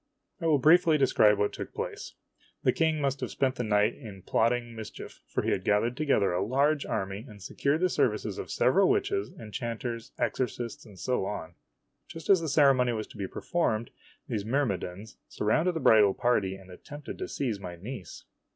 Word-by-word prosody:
I 165 - 0
will 155 -2 +4
briefly 160 +3 +5
describe 110 -6 +4
what 105 0 0
took - - -7
place. - - -5 0.5
The - - +4
King 160 -1 +1
must 135 -1 0
have - - -3
spent 130 -1 0
the 125 - -3
night 105 0 +2
in 100 -8 -11
plotting 120 0 0
mischief, 110 -1 -9
for - - -2
he - - 0
had - - -1
gathered 105 +4 +2
together 130 -11 +2
a 90 +2 0
large 140 +6 +1
army, 95 +2 -3
and 105 -2 -12
secured 140 - -1
the 185 - +4
services - - 0
of - - -6
several - - +3
witches, 400 0 0
enchanters, 115 +1 -5
exorcists, 120 -2 -3
and 100 -3 -14
so 125 -1 -1
on. 85 -5 -5 0.5
Just 165 +3 -2
as 190 -3 +5
the 160 - -2
ceremony 135 -4 +4
was 110 -1 -3
to - - -14
be 100 -2 -3
performed, 115 - -1 0.4
these 105 - -2
myrmidons 105 -5 -2
surrounded 155 +12 +1
the - - -1
bridal 105 -7 +5
party 105 -6 +1
and 95 -1 -14
attempted 145 +9 -9
to - - -3
seize 120 -7 -2
my 90 -3 -7
niece. 100 +1 -8
120 Hz, 185 wpm, -28 LUFS, 105-140 Hz, 0.5 s, briefly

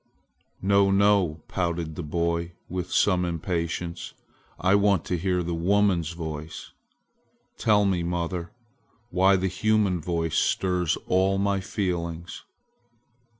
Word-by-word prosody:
"No, 100 0 +4
no!" 95 -5 +2
pouted 85 -3 -2
the 85 - -5
boy 85 +2 -2
with 90 0 -4
some 90 -3 +3
impatience. 85 0 -3 0.4
"I 95 +2 +3
want 100 -3 +3
to 90 - -1
hear 90 +1 0
the 85 0 -3
woman's 90 -1 +1
voice! 80 -2 -7 0.9
Tell 105 -2 +3
me, 95 -3 +1
mother, 85 0 -3 0.6
why 95 +1 +4
the 95 0 0
human 100 -1 +1
voice 85 -1 0
stirs 90 -3 +1
all 95 +1 +2
my 100 0 +1
feelings!" 85 -3 -4
90 Hz, 115 wpm, -26 LUFS, 85-95 Hz, 0.9 s, No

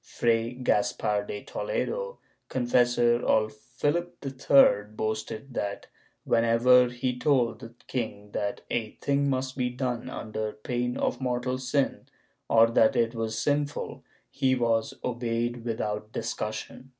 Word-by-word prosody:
Fray 115 0 0
Gaspar 105 -4 0
de 105 - -5
Toledo, - - -3 0.3
confessor 120 -1 +3
of 110 0 +2
Philip 145 +10 -2
III 135 -6 +5
boasted 110 +4 -3
that, 100 -3 -3 0.4
when 115 - +2
ever 125 +2 +5
he 125 +1 -3
told 125 -4 +2
the 115 0 -11
king 105 -5 -4
that 100 0 -2
a 110 -2 -1
thing 140 0 0
must 130 -1 -1
be 125 -2 0
done 125 -1 -3
under 110 -3 -4
pain 125 +2 -2
of - - -1
mortal 125 0 -1
sin 130 +2 -1 0.4
or 115 0 +6
that 115 +2 +4
it 115 -1 +2
was 110 -1 -3
sinful, 145 +4 -1 0.3
he 130 -1 +2
was 115 -2 +1
obeyed 120 -1 -2
without 105 -2 -3
discus 110 -1 -3
sion. 130 +3 -9
120 Hz, 135 wpm, -27 LUFS, 110-130 Hz, 0.4 s, or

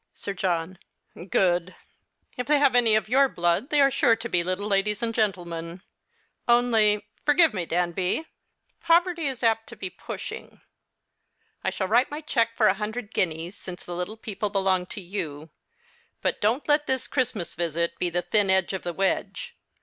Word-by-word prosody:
Sir 200 - -5
John. 180 -1 -2 0.5
Good. 180 -1 +1 0.6
If 250 - -4
they 300 0 +4
liave 280 -3 +4
any 230 -3 +5
of 215 -1 +1
your 270 +4 +4
blood 175 - 0
they 295 - +3
are 275 0 +5
sure 230 - +3
to 230 +1 -6
be 175 -6 +1
little 185 +3 -2
ladies 210 +2 0
and 230 -1 0
gentlemen. 175 -5 -2 0.6
Only 225 -4 +3
— - - -39
forgive 305 -1 +5
me, 175 -5 -3
Danby 180 - 0 0.3
— - - -47
poverty 335 -1 +2
is 265 -3 -4
ajjt 225 -1 +2
to 235 - -10
be 190 -3 -6
pushing. - - -8 1.0
I - - +1
shall 190 - -3
write 235 +6 +3
my 295 +2 -6
cheque 230 -6 0
for 220 - +3
a 190 - +5
hundred 215 +2 -5
guineas, 165 +2 0
since 180 -3 -9
the 175 - -6
little 180 +5 -4
people 210 -1 -3
belong 190 -2 +1
to 205 - -7
you; 160 -5 -6 0.7
but - - -1
don't 225 +7 +1
let 295 0 +3
this 260 -1 -1
Christmas 245 -9 -2
visit 170 0 -2
be 180 - +1
the 175 +1 -2
thin 205 -3 +2
end 190 0 +3
of 190 - -3
the 175 - -4
wedge. 195 +2 -2
205 Hz, 180 wpm, -25 LUFS, 180-240 Hz, 1.0 s, any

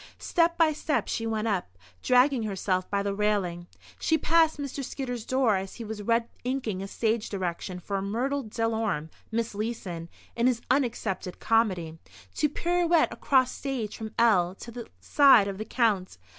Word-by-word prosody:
Step 335 -1 +1
by 320 -2 +4
step 300 0 -1
she 225 - -2
went 220 0 -1
up, 180 - -2 0.2
dragging 255 0 +4
herself 190 -3 -1
by 200 0 0
the 200 0 -1
railing. 195 -4 -1 0.3
She 320 - +2
passed 320 0 +3
Mr. 280 -1 -4
Skidder's 245 -3 -5
door 255 -6 +2
as 190 0 -6
he 235 - -7
was 215 -1 -6
red 230 +2 +1 0.2
inking 245 -7 -2
a 195 - -5
stage 220 +1 -1
direction 180 -1 -4
for 195 +2 -3
Myrtle 250 +8 -1
Delorme 220 - -2 0.2
(Miss 230 0 -1
Leeson) 200 -6 -4 0.3
in 235 +1 +2
his 250 -2 +2
(unaccepted) 225 -9 -1
comedy, 185 -8 +1 0.3
to 300 - +1
"pirouette 345 +1 +2
across 260 -3 +2
stage 255 -7 -4
from 220 -1 -7
L 190 -6 +3
to 235 - -10
the 235 0 -8
side 270 -8 +6
of 195 0 -5
the 215 - -4
Count." 210 - 0
225 Hz, 165 wpm, -27 LUFS, 195-260 Hz, 0.3 s, side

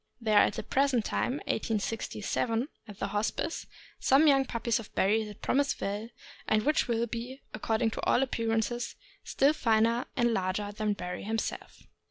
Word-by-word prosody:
There 215 -3 +4
are - - +7
at - - -1
the - - -4
present 265 -5 +2
time 250 - 0
(1867) 225 +3 -1 0.2
at 205 -2 -10
the 195 - -2
Hospice 210 +10 -2 0.3
some 275 +4 +5
young 270 -2 +5
puppies 235 -2 0
of 220 - -10
Barry 215 +3 +3
that 210 -1 -11
promise 280 +1 +1
well, 205 +3 -3 0.4
and 215 -1 +3
which 300 0 +2
will 235 -1 +1
be, 240 +3 -6
according 225 +1 0
to - - -4
all 260 - +3
appearances, 235 -1 -1 0.3
still 280 +3 +3
finer 230 -2 +2
and 240 -1 +3
larger 195 +1 -1
than 210 0 -1
Barry 180 -2 -5
himself. 220 +2 -4
225 Hz, 165 wpm, -30 LUFS, 210-245 Hz, 0.4 s, are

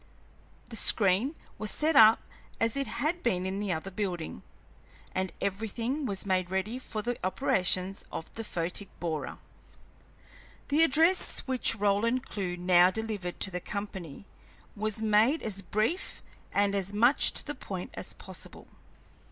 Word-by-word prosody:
The - - -6
screen 210 - +3 0.2
was 215 - -1
set 310 +5 +1
up 220 -2 +8 0.4
as 225 0 +2
it 275 -1 0
had 310 +8 -1
been 185 -6 0
in 190 +1 -2
the 205 -2 -1
other 175 +3 -3
building, 180 -5 -4 0.7
and 185 0 -1
everything 225 +8 -2
was 195 -2 -1
made 185 -2 +1
ready 190 +6 -2
for 215 -4 -5
the 240 +1 -2
operations 185 +1 +1
of 160 - -6
the 225 - -4
photic 180 0 -3
borer. 160 -3 -3 1.3
The 295 +3 +3
address 325 +4 +3
which 260 -3 +3
Roland 220 +5 +1
Clewe 180 -3 -4
now 180 0 +5
delivered 205 -4 -4
to 190 - +3
the 180 0 -4
company 195 -5 -6 0.5
was 215 +1 -1
made 220 +8 +3
as 200 -3 -1
brief 215 - -1 0.3
and 200 0 +2
as 195 -1 0
much 240 +7 +4
to - - -3
the - - -3
point - - -6
as - - -3
possible. - - -8
205 Hz, 145 wpm, -29 LUFS, 185-230 Hz, 1.3 s, up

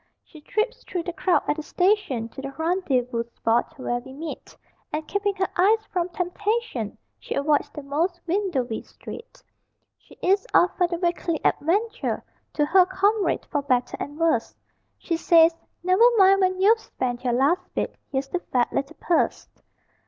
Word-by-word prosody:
She 310 - -15
trips 450 +9 -2
through 355 -2 -4
the 345 - -4
crowd 370 0 +2
at 295 - +1
the - - -3
station, 360 - +1
To 270 - -9
the 275 - -5
rendezvous 270 -8 0
spot 230 +1 0
where 245 -2 -2
we 260 +2 -12
meet, 310 +3 -8 0.3
And 305 +1 -3
keeping 405 0 -1
her 380 -1 0
eyes 430 +4 +3
from 355 -1 0
temptation, 360 - -2 0.2
She - - -5
avoids 290 0 +1
the 295 0 -9
most 330 +6 -1
windowy 330 - -1
street! 465 - -11 0.6
She - - -19
is 395 +6 +2
off 360 - +4
for 355 - +2
the 345 0 -3
Weekly 345 -2 -1
Adventure; 430 +9 0 0.3
To 295 - +2
her 360 +4 +5
comrade 400 +2 +1
for 290 - -1
better 255 -3 0
and 290 +1 -6
worse 330 -1 +1 0.4
She 335 - -2
says, 330 0 +5 0.3
"Never 370 +4 +2 0.2
mind, 390 0 +6
when 370 0 +1
you've 435 +4 +5
spent 250 - -4
your 245 -2 +1
Last 285 +9 +3
bit, - - -1 0.2
here's 270 0 -1
the 360 - -1
fat 250 -8 -1
little 280 +4 -3
purse." 345 - 0
340 Hz, 165 wpm, -24 LUFS, 280-385 Hz, 0.6 s, mind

